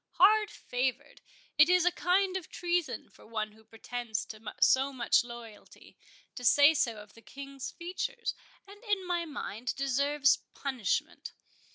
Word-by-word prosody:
—Hard 425 +2 +5
favoured?—it 285 - -1
is 360 -1 +4
a 360 - +5
kind 370 +2 +1
of 370 -4 -4
treason 350 -2 -2
for - - -19
one 215 -1 -3
who 220 +1 -20
pretends 225 0 -5
to 215 -1 -10 0.2
so 270 +1 +4
much 245 -3 +2
loyalty, 235 -3 -12 0.4
to 250 - -8
say 285 +6 +7
so 250 -7 +1
of 210 0 -12
the 230 - -16
King's 275 +1 -8
features, 415 +7 -4 0.3
and 405 +3 -15
in 410 -4 -1
my 345 -1 -1
mind 250 -5 -5
deserves 275 +1 +2 0.2
punishment. 260 -8 -2
280 Hz, 145 wpm, -30 LUFS, 240-355 Hz, 0.4 s, say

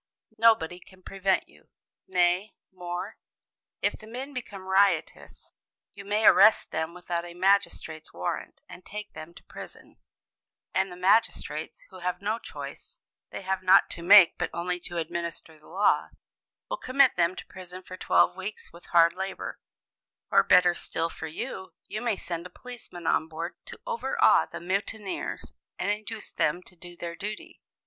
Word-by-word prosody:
Nobody 200 -7 +4
can 185 +1 -19
prevent 195 0 0
you. - - -23 0.4
Nay, 180 +2 +2 0.2
more, 180 +3 -6 0.7
if - - +2
the 215 - -13
men 260 +5 -6
become 205 -7 -7
riotous, 195 +1 +1 0.4
you 200 - -10
may 210 +2 0
arrest 215 +4 +7
them 160 +2 -3
without 175 -1 -3
a 175 0 -10
magistrate's 180 -4 +1
warrant, 90 +1 -4
and 180 - -12
take 210 +3 -8
them 165 +2 -10
to - - -14
prison, - - -12 0.8
and 190 0 +1
the - - -8
magistrates, 205 - +1
who - - -11
have 180 0 -2
no 215 +3 -1
choice - - -9 0.3
(they - - -7
have 190 0 -1
not 185 +1 +5
to 170 - -4
make, 185 0 +8
but - - -1
only 180 +1 -2
to 175 0 -7
administer 165 -1 -4
the 150 - -20
law), 195 +4 +2 0.6
will - - -3
commit 265 0 +3
them 175 +1 +2
to - - -8
prison 185 0 -10
for 185 - -9
twelve 90 - +3
weeks 190 0 -7
with 170 - -15
hard 170 -1 +5
labor; 190 +1 -5 0.7
or - - +7
better 180 -1 +5
still 165 -1 -2
for - - -6
you, 190 +3 -6
you 215 +2 -5
may 235 -3 +1
send 175 -2 -5
a - - -22
policeman 235 -9 -10
on 160 - +2
board 165 +2 -5
to - - -10
overawe 470 -2 +3
the - - -7
mutineers, 195 +3 -3 0.2
and 205 - 0
induce 215 +1 -5
them 175 +4 0
to 180 - -14
do 175 0 -12
their 170 0 -5
duty! 210 +3 -7
185 Hz, 165 wpm, -27 LUFS, 170-205 Hz, 0.8 s, make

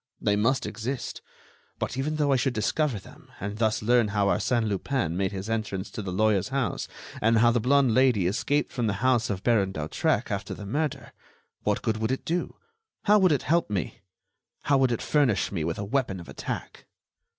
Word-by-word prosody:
"They 105 - +2
must 115 +6 +1
exist. 120 +4 -4 0.6
But - - -3
even 145 +4 -1
though 145 -2 +1
I - - +5
should 130 0 0
discover 135 +3 0
them, 95 - -14
and 100 +2 -5
thus 110 -1 +1
learn 120 0 +4
how 105 -1 +1
Arsène 110 +3 +1
Lupin 100 - -1
made 95 0 0
his 95 0 -5
entrance 110 -4 -3
to - - -5
the 95 -2 -4
lawyer's 105 0 +2
house 135 -2 -1 0.3
and 115 +1 +4
how 120 +1 +5
the 120 - +2
blonde 130 +1 +3
Lady 125 -7 +4
escaped 130 +10 0
from 120 -3 0
the 100 - +1
house 125 -3 +3
of 100 -2 -3
Baron 105 -5 +2
d'Hautrec 75 -2 -1
after 100 0 -3
the 105 - -8
murder, 140 +1 -2 0.5
what - - 0
good 110 -1 0
would 110 +2 -1
it 130 - -3
do? 175 +2 -2 0.5
How 210 +1 +5
would 185 -3 +4
it 145 - +1
help 165 -1 +1
me? 100 -5 -3 0.7
Would 135 -3 +4
it 120 - -2
furnish 140 -9 +2
me 85 -6 -2
with 80 +1 -2
a 100 - -3
weapon 115 -4 -1
of 85 - -10
attack?" - - -6
115 Hz, 195 wpm, -27 LUFS, 100-135 Hz, 0.7 s, I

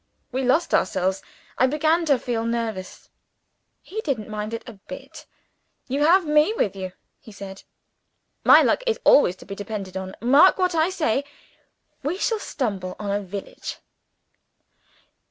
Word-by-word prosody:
_ - - -47 0.3
We 260 +1 -1
lost 265 +7 +2
ourselves. 190 +1 +1 0.4
I 255 - +5
began 315 +4 +2
to 285 -4 +4
feel 235 -2 -2
nervous. 230 -5 -4 0.7
He 435 +4 -5
didn't 245 - -3
mind 210 0 -4
it 230 - -6
a 235 - -8
bit. - - -10 0.6
'You 275 +3 0
have 350 +4 +5
Me 300 +7 +3
with 200 - 0
you,' 185 -1 -6 0.3
he 220 - -14
said; 195 -1 -9 0.8
'My - - +8
luck - - +2
is 460 - +1
always 185 -11 +5
to - - -15
be 200 - -7
depended 200 -2 -6
on. 190 0 -5
Mark 275 - +6
what 365 -2 +1
I 320 +1 +2
say! 305 -8 0 0.8
We 300 +7 -2
shall 445 +2 0
stumble 200 - -3
on 205 -1 -4
a 205 +1 0
village!' 200 0 -7
235 Hz, 155 wpm, -24 LUFS, 200-310 Hz, 0.8 s, My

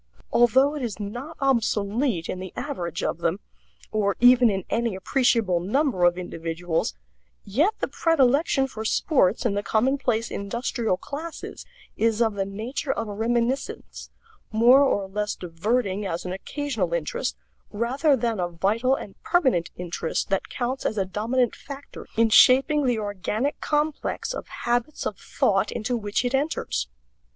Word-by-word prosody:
Although 260 +4 +5
it 300 - -4
is 220 -6 -4
not 245 +10 -6
obsolete 225 - +1
in 185 - -4
the 185 0 -7
average 180 - -4
of - - -1
them, 170 +3 0 0.5
or 200 -2 +1
even 245 -1 +7
in 195 -2 -2
any 230 -2 -1
appreciable 220 -3 +2
number 210 - +1
of 175 0 +3
individuals, 165 - -3 0.5
yet 300 - +1
the - - +1
predilection 280 -3 +2
for 220 -5 -6
sports 220 - +2
in 225 - +2
the 205 - 0
commonplace 230 0 0
industrial 225 0 -2
classes 315 - -7 0.3
is 225 0 +1
of 225 -2 +2
the 195 -1 -2
nature 230 +8 -3
of 225 - -3
a - - -4
reminiscence, 235 +5 -2 0.4
more 240 +5 +6
or 205 -8 +2
less 210 +2 -2
diverting 195 +4 -1
as 180 -3 -3
an 180 - -3
occasional 215 - -2
interest, 150 - -2 0.3
rather 265 +7 +1
than 230 -4 -1
a 175 - 0
vital 210 +10 +1
and 200 - -10
permanent 260 - +2
interest 175 -2 -3
that 195 -1 -1
counts 255 +2 -3
as 215 - -1
a 195 - +1
dominant 230 +6 0
factor 280 0 -10
in 225 -1 +4
shaping 270 +5 +6
the 245 -2 +2
organic 210 +6 -2
complex 300 +10 -1
of - - -6
habits 240 +5 -2
of - - -2
thought - - +1
into 240 +2 -2
which 210 +1 -1
it 245 - -1
enters. 280 - -1
225 Hz, 150 wpm, -25 LUFS, 195-265 Hz, 0.5 s, even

